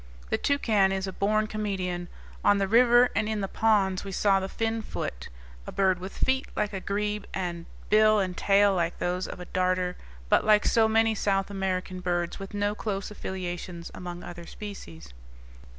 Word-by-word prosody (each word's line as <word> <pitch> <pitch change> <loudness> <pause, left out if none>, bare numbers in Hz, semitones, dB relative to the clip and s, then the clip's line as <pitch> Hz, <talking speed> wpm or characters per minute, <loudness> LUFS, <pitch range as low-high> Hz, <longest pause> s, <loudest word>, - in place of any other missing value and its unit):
The - - +2
toucan 215 -9 +2
is 190 0 -1
a 190 - -5
born 215 +3 +1
comedian. 190 -5 -3 0.4
On 205 - +5
the 195 -1 +1
river 240 +3 +5
and 215 - +1
in 215 -1 -1
the 195 - -1
ponds 200 -3 +2
we 195 - -6
saw 195 0 +3
the 190 0 -4
finfoot, 225 - -3 0.4
a - - -5
bird 190 -2 +2
with 190 +2 -8
feet 265 0 +1
like 210 0 -1
a 195 - -2
grebe 210 +1 -2
and 175 -2 -4 0.2
bill 215 0 +6
and 185 -3 -1
tail 200 +1 +4
like 175 -2 -1
those 180 +1 -1
of - - -8
a 180 - -7
darter, 185 0 0 0.3
but, - - +4
like 210 -1 +4
so 225 -1 +4
many 225 0 +3
South 195 -1 0
American 185 -1 -2
birds, 175 -1 -2
with 195 +1 -7
no 205 0 0
close 205 -2 -4
affiliations 180 -3 -5
among 175 -1 -7
other 170 -1 -9
species. 85 - -9
195 Hz, 180 wpm, -27 LUFS, 180-210 Hz, 0.4 s, bill